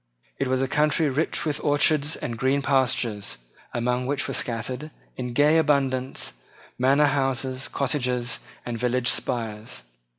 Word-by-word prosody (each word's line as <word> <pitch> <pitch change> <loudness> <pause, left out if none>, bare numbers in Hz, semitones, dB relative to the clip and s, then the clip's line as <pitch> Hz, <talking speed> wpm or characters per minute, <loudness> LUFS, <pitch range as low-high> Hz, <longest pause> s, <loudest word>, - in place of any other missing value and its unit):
It 135 - 0
was 130 +1 +1
a - - 0
country 150 +2 +2
rich 150 +6 0
with 150 -2 -2
orchards 150 +1 +3
and 120 - -4
green 135 +4 +1
pastures, 125 - +1 0.3
among 125 +1 -1
which 140 0 0
were - - -3
scattered, 125 +5 -2 0.3
in 125 -1 -4
gay 150 +5 +5
abundance, 135 - 0 0.5
manor 135 +4 +4
houses, 135 -2 0
cottages, 125 -3 -1 0.3
and 120 -1 -4
village 125 0 +1
spires. 110 - -2
130 Hz, 135 wpm, -25 LUFS, 125-145 Hz, 0.5 s, gay